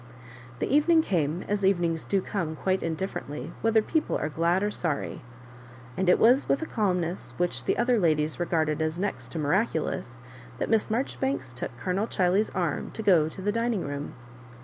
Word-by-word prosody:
The - - -1
evening 320 +2 +5
came, 165 - 0
as 205 -1 -1
evenings 175 -4 +1
do 195 -1 +1
come 170 -6 -3
quite 190 +4 0
indiflforently 160 -3 -4
whether 225 -1 +3
people 315 +6 0
are 150 - -2
glad 170 +5 +1
or 210 - 0
sorry; 165 -7 -3 0.7
and 190 -1 +1
it - - +6
was 250 +5 +4
with 275 - +2
a - - -2
calmness 180 - -1
which 175 0 -1
the - - +1
other 240 -1 +3
ladies 155 -3 +1
regarded 160 -3 0
as 160 +1 -1
next 200 +3 -3
to - - -4
miraculous, 150 - -1 0.4
that - - -2
Miss 220 -1 +2
Marjoribanks 245 - -2
took 125 0 -6
Colonel 185 - -1
Ghiley's 190 +2 +2
arm 175 -5 -2
to 220 - -5
go 170 -7 +4
to 190 - -9
the 205 - +1
dining 230 -3 0
room. 145 0 -5
180 Hz, 175 wpm, -27 LUFS, 160-215 Hz, 0.7 s, it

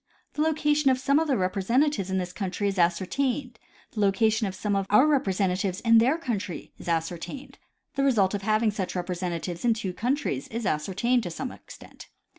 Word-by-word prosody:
The 300 - -2
location 300 -2 +2
of 260 - +3
some 280 +3 +2
of 320 - 0
their 275 - +2
reiDresentatives 200 +4 +1
in 190 - 0
this 180 -1 -3
country 195 +1 -2
is 195 -1 -2
ascertained; 240 +9 0 0.3
the 215 - -6
location 215 +2 +2
of 190 - -5
some 205 +2 -1
of 195 -1 -1
our 210 +7 +6
rep 295 -3 +2
resentatives 190 -1 0
in 230 -1 +6
their 260 +8 +3
country 210 - -4
is - - -11
ascertained; 170 - -4 0.3
the 275 - 0
result 215 -8 +3
of 205 - -2
having 215 +2 +2
such 195 -3 -4
representatives 175 -1 -3
in 235 -2 +3
two 195 -5 -4
countries 235 - -1
is 230 0 -5
ascertained 200 +11 +1
to 180 - -5
some 255 +10 -5
extent. - - -13
210 Hz, 190 wpm, -26 LUFS, 185-255 Hz, 0.3 s, our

